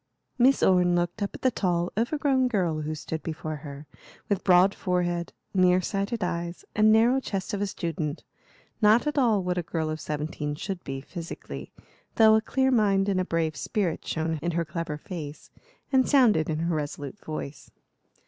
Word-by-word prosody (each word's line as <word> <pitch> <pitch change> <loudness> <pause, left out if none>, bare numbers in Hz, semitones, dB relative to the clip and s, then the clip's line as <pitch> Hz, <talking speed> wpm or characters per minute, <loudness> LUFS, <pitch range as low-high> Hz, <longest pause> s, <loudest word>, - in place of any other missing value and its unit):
Miss 260 +3 +4
Orne 180 -1 +4
looked 175 +3 -1
up 200 - -2
at - - -11
the 260 - +4
tall, 175 -5 0
overgrown 260 +3 +1
girl 175 -9 0
who 155 +1 -3
stood 160 +1 -5
before 155 -1 -5
her, 145 0 -9 0.4
with 200 -2 0
broad 185 +1 +5
forehead, 175 -2 -1 0.2
near 185 -1 +4
sighted 200 +4 -2
eyes, 170 0 -3
and 215 +1 +5
narrow 235 +4 +5
chest 195 -5 -4
of 200 - -2
a 205 - 0
student; 160 -5 -4 0.6
not 215 +4 +5
at 295 -1 0
all 220 -7 +3
what 180 0 -1
a - - 0
girl 160 -2 -2
of 155 - -5
seventeen 150 0 -3
should 190 +3 -5
be, 135 0 -5
physically, 170 +3 -8 0.4
though 220 -1 +7
a 220 - +4
clear 265 +3 +1
mind 200 -4 +3
and 190 -2 +1
a - - 0
brave 165 -3 -1
spirit 170 +5 -2
shone 160 0 -2
in 170 +2 -1
her 170 0 0
clever 155 -1 -4
face 150 -2 -8 0.4
and 260 -2 +3
sounded 225 - +4
in 155 - -1
her 165 +1 -1
resolute 145 +4 -5
voice. 150 -3 -6
180 Hz, 180 wpm, -27 LUFS, 160-210 Hz, 0.6 s, though